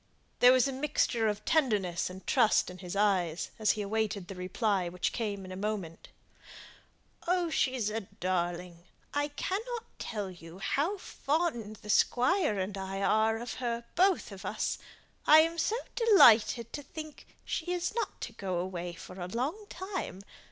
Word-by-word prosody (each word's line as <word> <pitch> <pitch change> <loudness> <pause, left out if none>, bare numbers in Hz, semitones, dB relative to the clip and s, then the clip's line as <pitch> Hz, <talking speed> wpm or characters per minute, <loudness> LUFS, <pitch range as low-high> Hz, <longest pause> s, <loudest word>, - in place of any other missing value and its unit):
There 245 - +8
was 255 +1 +4
a - - -2
mixture 260 -4 +1
of 210 0 -2
tenderness 210 - +1
and 185 +1 -10
trust 225 -7 +3
in 180 - -11
his 180 0 -6
eyes, 185 -5 +1
as 215 -2 +3
he 210 - -3
awaited 205 -2 -1
the 195 - -6
reply, 185 0 0
which 180 +1 -2
came 205 -4 -3
in 185 - -9
a - - -5
moment. 195 -5 -4 1.4
"She's 255 -8 +1
a 225 - -1
darling. 175 -2 -3 0.3
I 290 0 +1
cannot 440 +10 -3 0.2
tell 205 -4 -4
you 170 -1 -12
how 300 - 0
fond 285 - -2
the 210 - -10
Squire 255 - +3
and 190 +1 -2
I 195 +1 -3
are 220 +2 +3
of 240 +2 -5
her; 235 -1 -2
both 370 - +2
of 195 0 -9
us. 205 +3 -2 0.5
I 310 +1 +9
am 330 +1 0
so 430 - +1 0.2
delighted 240 - +6
to 290 - -4
think 310 +1 -9 0.2
she 350 +2 -2
isn't 360 +6 -2
to - - -5
go 185 -3 -3
away 175 -1 -3
for 180 +1 -10
a 175 - -3
long 285 - -3
time. 370 - -5
215 Hz, 160 wpm, -30 LUFS, 185-290 Hz, 1.4 s, I